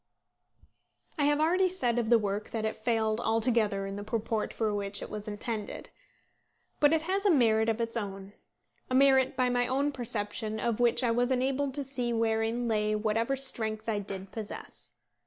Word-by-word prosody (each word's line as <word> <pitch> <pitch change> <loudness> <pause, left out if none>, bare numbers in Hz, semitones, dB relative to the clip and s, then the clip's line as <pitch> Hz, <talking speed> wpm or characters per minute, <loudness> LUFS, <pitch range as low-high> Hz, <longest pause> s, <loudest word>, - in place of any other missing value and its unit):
I 290 - +3
have 295 0 +3
already 365 +4 +3
said 245 -10 0
of 225 -2 -1
the 235 - +7
work 205 -1 -3
that 220 -1 -3
it 220 - -1
failed 220 -1 0
altogether 220 -3 +2
in 195 0 -5
the 205 - -5
purport 220 0 -2
for 220 -2 -1
which 200 0 -3
it - - -8
was 210 0 -6
intended. 210 0 -5 0.9
But 290 0 +5
it 320 -1 +2
has 385 +4 -1
a 410 - +4
merit 225 - +4
of 225 +1 -1
its 230 0 -2
own, 195 -2 -5 0.6
a 255 - 0
merit 265 -1 +4
by 255 -1 +2
my 245 0 +1
own 275 +3 +1
perception 220 -3 -3
of 235 -2 -1
which 240 +1 +3
I 235 - +2
was 245 +2 +1
enabled 265 +1 0
to 285 - -1
see 250 -3 -2
wherein 225 +1 0
lay 215 -1 +1
whatever 225 +4 0
strength 220 -5 -2
I 215 -2 0
did 195 -1 -7
possess. 215 -2 -7
230 Hz, 185 wpm, -29 LUFS, 215-260 Hz, 0.9 s, the